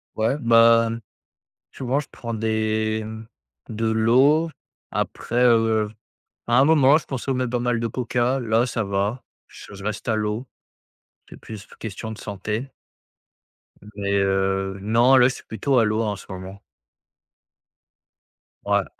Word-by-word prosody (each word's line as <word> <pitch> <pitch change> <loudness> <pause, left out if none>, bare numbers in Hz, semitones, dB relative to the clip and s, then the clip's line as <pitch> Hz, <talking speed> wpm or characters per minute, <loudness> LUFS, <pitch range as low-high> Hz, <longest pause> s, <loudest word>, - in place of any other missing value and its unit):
Ouais 115 +6 0
bah, 115 -2 +5
mmh 115 +1 -4 0.7
souvent 130 +2 -1
je 145 - -10
prends 115 -1 -7
des, 110 0 -1
mmh, 110 +1 -8 0.4
de 115 +1 -4
l'eau. 130 +9 +3 0.4
Après, 120 +2 -1
heu, 115 -3 +3 0.6
à 120 +1 +4
un - - +6
moment 150 -2 +5
je - - -16
consommais 130 -1 -2
pas 125 +1 -1
mal 120 -1 0
de 115 - -1
Coca, 125 +2 -1
là 115 -1 +1
ça 115 -2 -2
va, 100 +5 -2 0.2
je - - -13
reste 105 +1 -4
à 110 - +2
l'eau. 105 +3 -2 0.8
C'est - - -11
plus 105 -3 -10
question 110 +1 -6
de 110 - -8
santé. 105 +5 -4 1.3
Mais, 100 -1 -2
heu, 95 0 0
non, 120 +5 +4
là 125 0 +6
c'est 130 - -8
plutôt 125 +5 -1
à 115 - +4
l'eau 110 +1 0
en 105 -2 -1
ce 95 - -12
moment. 95 +1 -8 2.0
Ouais. - - +1
115 Hz, 140 wpm, -23 LUFS, 105-125 Hz, 2.0 s, un